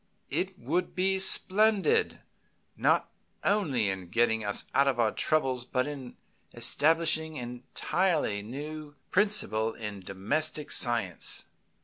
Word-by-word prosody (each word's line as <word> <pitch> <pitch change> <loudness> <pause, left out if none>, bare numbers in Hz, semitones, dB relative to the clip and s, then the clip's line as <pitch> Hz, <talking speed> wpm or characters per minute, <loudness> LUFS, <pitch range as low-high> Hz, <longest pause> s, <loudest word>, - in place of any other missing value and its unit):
It 190 0 -2
would 180 -1 -2
be 190 +1 +1
splendid, 215 - +2 0.5
not - - +1 0.3
only 150 - +1
in 95 -2 -4
getting 110 0 +1
us 105 -1 -1
out 140 - +3
of 130 -3 0
our 110 -2 +3
troubles, 135 -6 0
but 125 +1 -1
in 140 -4 -8 0.4
establishing 160 0 +2
an 120 0 -7
entirely 165 - 0
new 145 +6 -8 0.2
principle 150 - +1
in 105 -2 -6
domestic 140 +12 -1
science. 115 -8 +1
140 Hz, 115 wpm, -29 LUFS, 115-175 Hz, 0.5 s, out